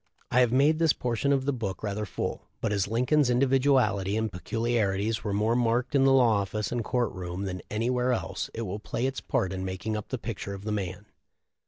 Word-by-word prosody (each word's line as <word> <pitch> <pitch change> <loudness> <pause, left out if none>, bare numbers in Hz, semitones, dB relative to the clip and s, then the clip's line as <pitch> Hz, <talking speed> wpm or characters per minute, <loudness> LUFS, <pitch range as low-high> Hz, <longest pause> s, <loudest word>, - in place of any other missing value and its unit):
I 125 - +4
have 125 -2 +4
made 145 +5 +4
this 165 -3 +4
portion 125 +3 -1
of 135 -1 +2
the 140 - +1
book 110 -6 -4
rather 105 0 -2
full; - - -4
but 105 - -1
as 100 -1 +1
Lincoln's 125 +5 +2
individuality 125 -6 +3
and 110 -1 -1
peculiarities 110 +1 0
were 105 - -2
more 105 +3 +1
marked 120 +1 +1
in 135 -1 +4
the 135 - +5
law 120 -6 +5
office 105 +2 -3
and 120 -1 -1
court 120 0 0
room 90 +1 -5
than 90 -1 -4
anywhere 125 +3 0
else 120 - -2
it 115 - -3
will 100 0 -4
play 115 +3 -3
its 135 0 -2
part 95 -1 -1
in 95 0 -4
making 95 +4 -3
up 105 - -5
the 130 - -2
picture 100 -4 -5
of 100 - -10
the 105 - -3
man. 100 -1 -3
115 Hz, 215 wpm, -28 LUFS, 100-125 Hz, -, the